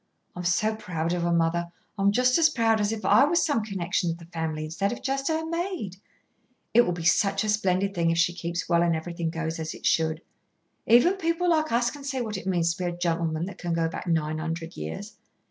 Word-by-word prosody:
I'm 180 0 -6
so 215 +5 +2
proud 170 -5 -3
of 175 - -1
her, 170 0 0
mother; 170 +1 +1 0.2
I'm 200 -1 +3
just 250 +7 +3
as 320 -1 +6
proud 225 -6 +2
as 205 +1 +1
if 225 -1 -4
I - - +6
was 340 +3 +2
some 290 -8 +1
connection 185 -4 -1
of 165 - -3
the 170 - -13
family, 160 -2 -4
instead 165 +6 -1
of 240 - -6
just 270 +1 -1
her 320 0 0
maid. 335 - -3 0.8
It'll 240 -5 +5
be 175 -1 -4
such 195 +5 +3
a 215 - -2
splendid 195 -1 +1
thing 170 -3 +1
if 165 - +1
she 170 +1 +3
keeps 170 0 -4
well 170 -1 +3
and 170 -1 +2
everything 170 +1 -3
goes 165 0 -3
as 160 0 -4
it - - -10
should. 160 0 +1 0.6
Even 250 - +5
people 345 0 +1
like 310 -3 +1
us 235 +1 +2
can 290 -1 -10
see 275 -1 -3
what 220 -3 -3
it 190 - -6
means 170 -3 +1
to 180 +1 -4
a - - -1
gentleman 170 -2 -1
that 195 - -9
can 175 -1 -2
go 165 0 +1
back 165 - -6
nine 155 -2 0
hundred 165 +1 -4
years. 80 +1 -7
180 Hz, 230 wpm, -26 LUFS, 165-230 Hz, 0.8 s, as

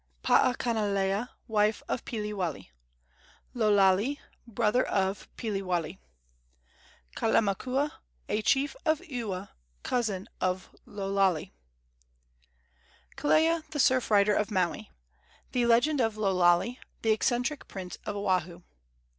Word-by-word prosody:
Paakanilea, 210 -3 +1 0.2
wife 210 -1 +1
of - - -2
Piliwale. 195 - -4 0.8
Lo 220 -4 +2
Lale, 200 +6 +4 0.3
brother 230 +2 +1
of 195 0 -1
Piliwale. 190 -6 -2 1.2
Kalamakua, 250 +7 +1 0.4
a 210 +1 0
chief 275 +5 +1
of 315 -1 +2
Ewa, 215 - -5 0.3
cousin 215 -5 -1
of 185 0 -2
Lo 200 -1 -5
Lale. 190 -5 +2 1.6
KELEA, 320 +4 +3
THE 295 - -5
SURF 255 -1 +3
RIDER 205 -1 +4
OF 210 +1 0
MAUI. 190 +1 -1 0.6
THE 245 -1 +1
LEGEND 255 +5 +3
OF 225 -2 0
LO 205 -2 +1
LALE, 180 +7 +3 0.3
THE 225 - +3
ECCENTRIC 245 +6 0
PRINCE 185 -2 -7
OF 210 - -4
OAHU. 180 -3 -1
210 Hz, 105 wpm, -29 LUFS, 190-245 Hz, 1.6 s, Lale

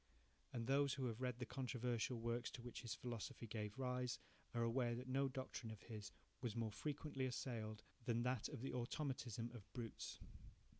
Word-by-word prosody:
And 120 -2 0
those 140 +2 +5
who 135 -2 +1
have 115 0 0
read 125 -2 +2
the 125 - -1
controversial 125 -1 +1
works 120 +1 +1
to 120 - -5
which 120 -1 -4
his 115 -2 -1
philosophy 120 -1 -3
gave 105 -1 -2
rise, 125 -2 +2 0.3
are 120 -1 +3
aware 120 0 +4
that 125 +2 -3
no 135 +1 +4
doctrine 130 -2 -2
of 110 -2 -6
his 105 -3 -4 0.3
was 120 -4 0
more 115 -2 +2
frequently 145 +1 0
assailed 110 -4 -1 0.2
than 120 -1 +4
that 125 -3 +2
of - - -4
the 135 - -1
automatism 125 -2 0
of 105 -4 -8
brutes. 120 -3 -3
120 Hz, 180 wpm, -46 LUFS, 115-130 Hz, 0.3 s, those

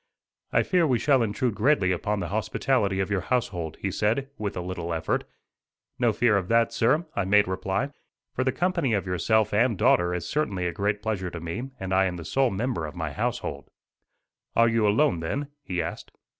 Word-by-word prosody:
"I - - +3
fear 180 -3 +2
we 125 -4 +3
shall 135 +1 +3
intrude 115 +2 0
greatly 105 -3 +2
upon 100 +3 -1
the 85 - -3
hospitality 105 0 0
of 95 +1 -1
your 100 -2 +1
household;" 90 -9 -2
he 100 - -1
said, 115 +8 0
with 105 -3 -4
a - - -2
little 85 -2 -4
effort. 80 0 -1 0.7
"No 120 -2 +3
fear 110 -1 +3
of 95 -2 -2
that, 115 +1 +3
sir," 135 +10 +2
I 100 - +1
made 105 +1 +4
reply; 95 +8 -2 0.4
"for 130 - 0
the 130 - +1
company 175 -6 0
of 100 - -1
yourself 105 +4 +1
and 115 0 +3
daughter 90 0 +3
is 85 -1 -4
certainly 100 -12 -1
a 90 - -1
great 105 +3 -1
pleasure 100 -5 -2
to 85 - -7
me 85 +11 -5
and 95 -1 -3
I 95 +1 +4
am 90 -2 -2
the 85 - -8
sole 135 +4 +2
member 100 -6 -2
of 75 - -10
my - - -3
household." - - -3 0.9
"Are 115 0 +5
you 115 -2 +2
alone, 110 - +3
then?" 140 - -3
he 90 - -2
asked. 85 - -6
105 Hz, 200 wpm, -26 LUFS, 90-125 Hz, 0.9 s, Are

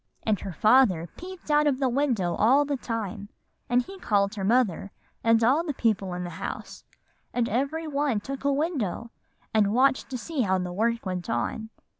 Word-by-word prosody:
And 215 -3 +1
her 195 - -6
father 190 - +4
peeped 360 -3 -8
out 295 0 +4
of 275 -3 +2
the 270 -1 +1
window 240 -9 0
all 265 +7 +4
the 285 0 -1
time, 220 -5 -5 0.4
and 245 +1 +3
he 385 +5 -11
called 200 - +1
her 200 -2 -5
mother, 200 -3 +1 0.3
and 230 0 +4
all 270 +8 +4
the 300 -5 -3
people 200 -7 0
in 180 - -4
the 175 - -5
house; - - -6 0.5
and 240 -1 +1
every 280 +8 -1
one 280 -6 0
took 270 +6 -6
a 280 - +2
window, 275 - -2 0.4
and 210 -2 +3
watched 265 +1 +3
to 260 - -3
see 290 +4 -3
how 190 -4 +2
the 180 -1 -3
work 230 +4 0
went 185 +1 -4
on." 220 -1 -2
235 Hz, 190 wpm, -26 LUFS, 200-275 Hz, 0.5 s, father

